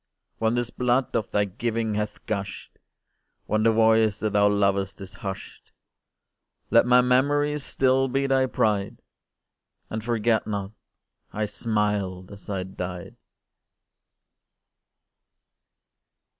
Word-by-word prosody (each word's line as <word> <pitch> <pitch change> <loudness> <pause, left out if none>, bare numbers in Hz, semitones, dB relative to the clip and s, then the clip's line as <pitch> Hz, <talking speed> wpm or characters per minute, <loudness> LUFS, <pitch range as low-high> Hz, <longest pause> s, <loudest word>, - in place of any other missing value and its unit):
When 115 +1 +1
this 120 -1 -1
blood 125 +1 0
of 115 - -1
thy 105 0 +2
giving 110 +2 -2
hath 105 0 -4
gush'd, 100 -2 -5 0.7
When 110 +1 0
the 115 +1 +4
voice 110 -2 +3
that 110 -1 -2
thou 105 0 +4
lovest 100 -1 0
is 95 -2 -9
hush'd, 95 -1 -8 1.0
Let 115 +2 +5
my 125 0 +6
memory 145 +4 +2
still 135 -1 +2
be 135 +2 0
thy 135 -1 +2
pride, 105 -5 -1 0.9
And 110 0 -3
forget 115 -1 +1
not 100 -2 -3 0.6
I 110 0 -2
smiled 105 -4 -2
as 100 0 -10
I 95 -2 -2
died! 90 -1 -7
110 Hz, 115 wpm, -25 LUFS, 100-120 Hz, 1.0 s, my